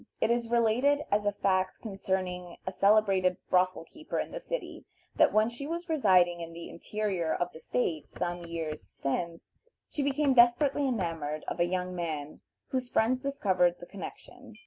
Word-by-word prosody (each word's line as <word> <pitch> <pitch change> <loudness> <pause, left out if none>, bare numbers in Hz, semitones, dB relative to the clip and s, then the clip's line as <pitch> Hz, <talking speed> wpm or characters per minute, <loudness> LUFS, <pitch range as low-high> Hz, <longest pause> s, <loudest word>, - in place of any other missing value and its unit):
It 225 - +2
is 235 -1 0
related 240 +5 +3
as 205 0 +2
a - - +4
fact 185 -2 0
concerning 185 -4 -3
a 185 - -2
celebrated 195 -2 +3
brothel 185 -1 +3
keeper 310 - -7
in - - -2
the - - -5
city, - - -5 0.3
that - - +6
when 215 +1 +4
she 240 +4 -6
was 340 +2 -4
residing 185 - +4
in 165 0 -7
the 170 0 -8
interior 190 -3 -2
of 175 0 -2
the 160 - -10
State, 155 +3 -2
some 175 0 -3
years 165 -2 -4
since, 165 +4 -4 0.3
she 295 - -2
became 280 0 +2
desperately 260 +4 +4
enamored 165 - -2
of - - -4
a 175 - +4
young 180 0 -2
man 155 -4 -4 0.3
whose 255 -1 -2
friends 245 +3 +2
discovered 190 -11 +2
the 175 - -10
connection. 200 +2 -10
190 Hz, 170 wpm, -30 LUFS, 175-240 Hz, 0.3 s, that